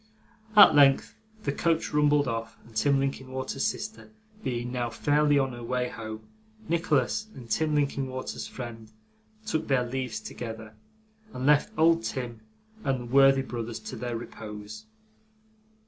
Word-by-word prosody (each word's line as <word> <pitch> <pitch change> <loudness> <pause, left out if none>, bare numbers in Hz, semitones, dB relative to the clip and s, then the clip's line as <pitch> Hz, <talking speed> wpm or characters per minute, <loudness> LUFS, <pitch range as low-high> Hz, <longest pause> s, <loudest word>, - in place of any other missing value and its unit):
At 205 - +10
length 140 -2 +5 0.3
the 140 - 0
coach 165 +2 0
rumbled 150 -1 +3
off, 115 -2 -4
and 115 -1 -17
Tim 140 +5 +3
Linkinwater's 130 0 -3
sister 215 0 -5 0.3
being 120 -1 -2
now 120 -1 -1
fairly 145 +5 +2
on 135 -1 +1
her 120 0 -8
way 125 +1 -1
home, 110 -1 -8 0.4
Nicholas 165 - +1
and 120 -3 -10
Tim 155 +7 +1
Linkinwater's 135 -3 -2
friend 115 -3 -8 0.5
took 160 -8 -1
their 130 -3 +2
leaves 125 -2 -3
together, 110 -2 -7 0.6
and 125 - -3
left 150 +7 +4
old 165 +1 +4
Tim 120 -7 -4 0.4
and 135 -2 0
the 120 - -7
worthy 135 -1 +6
brothers 120 -3 -5
to - - -7
their 120 -1 -3
repose. 110 -1 -9
130 Hz, 140 wpm, -28 LUFS, 115-145 Hz, 0.6 s, At